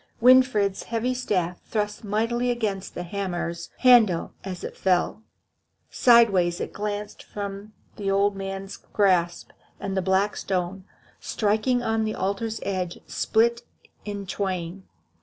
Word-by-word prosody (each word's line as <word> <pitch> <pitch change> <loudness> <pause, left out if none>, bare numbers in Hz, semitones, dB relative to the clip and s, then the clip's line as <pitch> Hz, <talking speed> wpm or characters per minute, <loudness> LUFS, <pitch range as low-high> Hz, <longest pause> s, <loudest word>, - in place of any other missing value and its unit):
Winfried's 245 -6 +5
heavy 235 +2 -1
staff 180 -8 -1
thrust 210 -1 -3
mightily 230 +4 0
against 215 -6 -2
the 175 - -4
hammer's 175 -2 -4
handle 230 -9 +5
as 185 -2 -6
it - - -6
fell. 185 +3 +1 0.7
Sideways 195 -8 +4
it - - -4
glanced 205 0 -4
from 200 +1 -7 0.2
the 200 -2 -2
old 200 +1 +2
man's 195 0 -5
grasp, 180 -4 +1 0.3
and 195 -1 -3
the 190 - +1
black 190 +2 +1
stone, 185 0 -2 0.3
striking 220 +4 0
on 225 -1 +1
the 215 0 -2
altar's 210 +4 -2
edge, 185 -3 -2
split 235 +2 +1 0.4
in 205 -1 -5
twain. 185 -1 -4
200 Hz, 125 wpm, -25 LUFS, 190-220 Hz, 0.7 s, Winfried's